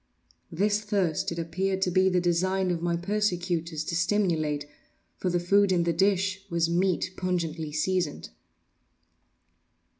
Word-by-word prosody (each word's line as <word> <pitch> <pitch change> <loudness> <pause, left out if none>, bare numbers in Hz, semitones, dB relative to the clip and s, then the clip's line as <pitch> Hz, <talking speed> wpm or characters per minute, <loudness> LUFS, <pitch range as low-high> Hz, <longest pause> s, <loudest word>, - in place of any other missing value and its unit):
This 205 +5 +1
thirst 195 -8 0
it 170 - -5
appeared 185 +4 -1
to 180 - 0
be 185 +1 +4
the 180 -1 +2
design 185 +2 +1
of 170 -2 -2
my 170 0 0
persecutors 175 -4 -1
to 170 - -3
stimulate—for 160 -3 -2
the 175 0 +1
food 200 +3 +3
in 175 -2 +2
the 170 0 +1
dish 190 +1 +1
was 170 -1 +1
meat 180 +1 0
pungently 165 -4 -2
seasoned. 175 +1 -1
180 Hz, 130 wpm, -27 LUFS, 170-190 Hz, -, be